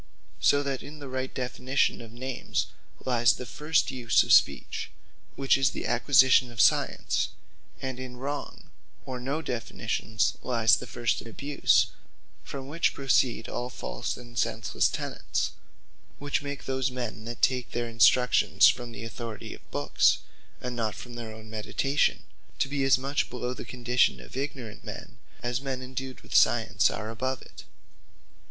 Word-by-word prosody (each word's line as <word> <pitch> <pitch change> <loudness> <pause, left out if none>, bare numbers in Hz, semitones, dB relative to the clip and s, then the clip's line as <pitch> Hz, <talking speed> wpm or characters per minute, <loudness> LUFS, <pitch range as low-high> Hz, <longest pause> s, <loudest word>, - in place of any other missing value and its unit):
So 145 0 +4
that 135 -2 -2
in 150 +2 -9
the 145 -2 -8
right 130 0 -3
Definition 130 +1 0
of 115 -1 -11
Names, 130 +2 -2 0.4
lyes 120 -3 +4
the 125 - -7
first 150 +3 +1
use 120 -4 +3
of - - +3
Speech; - - +3 0.5
which 135 0 +3
is 135 - +4
the - - -5
Acquisition 130 0 +5
of 115 - -10
Science: - - +3 0.5
And 130 -1 -3
in 125 -1 -7
wrong, 140 +3 -5 0.3
or 130 -1 -5
no 140 +6 -2
Definitions' 115 -3 -1
lyes 115 -4 +4
the - - -7
first 120 -1 -1
abuse; 140 +5 +2 0.5
from 135 -1 -7
which 165 +4 +1
proceed 130 -4 +2
all 125 +1 -3
false - - -4
and 120 -1 -12
senslesse - - +1
Tenets; - - -2 0.7
which 145 0 -1
make 145 -1 -6
those 130 -1 0
men 120 -4 -5
that 120 +1 -7
take 125 -2 +2
their 120 0 -2
instruction 125 +2 +4
from 120 -1 +5
the 110 - -7
authority 115 -1 -6
of - - -15
books, 70 +1 +3 0.4
and 125 -1 -4
not 110 -3 -1
from 120 - -9
their 120 -2 -6
own 110 0 -11
meditation, 115 +6 0 0.3
to - - +1
be 140 0 -1
as 135 -1 +5
much 135 +1 -1
below 125 0 -3
the - - -7
condition 125 +1 +1
of - - -12
ignorant 130 -5 -5
men, - - -9 0.2
as 120 +1 -1
men 130 -2 -3
endued 130 0 -6
with - - -17
true - - +8
Science - - +3
are 110 +2 -4
above 130 +3 -3
it. - - -13
125 Hz, 160 wpm, -28 LUFS, 120-135 Hz, 0.7 s, true